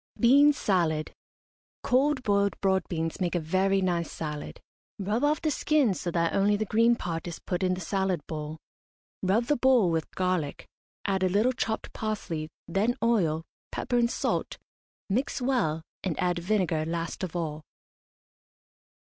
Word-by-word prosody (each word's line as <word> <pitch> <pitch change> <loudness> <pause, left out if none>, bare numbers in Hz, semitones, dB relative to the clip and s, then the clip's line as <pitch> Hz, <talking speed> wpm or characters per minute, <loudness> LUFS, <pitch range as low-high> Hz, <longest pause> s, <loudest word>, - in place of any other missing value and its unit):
BEAN 280 +5 +7
SALAD. 170 - 0 0.7
Cold 265 +1 +2
boiled 200 -2 +1
broad 190 -1 +2
beans 165 0 -3
make 180 -1 0
a - - +2
very 190 +4 +1
nice 170 -3 0
salad. 150 - -5 0.4
Rub 210 +5 -1
off 295 +1 +2
the 310 - +2
skins 280 -9 +2
so 175 - -2
that 170 -1 0
only 205 +1 +3
the 215 - -1
green 230 +3 +4
part 170 -6 -4
is 170 - -5
put 180 0 -3
in 185 -1 +2
the 185 - -7
salad 185 -3 -1
bowl. 155 0 -5 0.6
Rub 200 +5 +2
the 295 - +2
bowl 245 -8 +4
with 160 -1 -1
garlic, 180 -6 -1 0.4
add 195 -2 0
a 185 - +3
little 215 +7 +2
chopped 220 -2 -3
parsley, 170 -8 -3 0.2
then 205 +8 +1
oil, 170 -9 +2 0.3
pepper 245 - 0
and 235 0 +3
salt, - - -1 0.5
mix 250 +9 -1
well, 240 - 0 0.2
and 180 -5 -2
add 180 -1 +1
vinegar 175 -4 +1
last 165 +2 -3
of 180 -2 -4
all. 155 -3 -3
190 Hz, 155 wpm, -28 LUFS, 165-230 Hz, 0.7 s, BEAN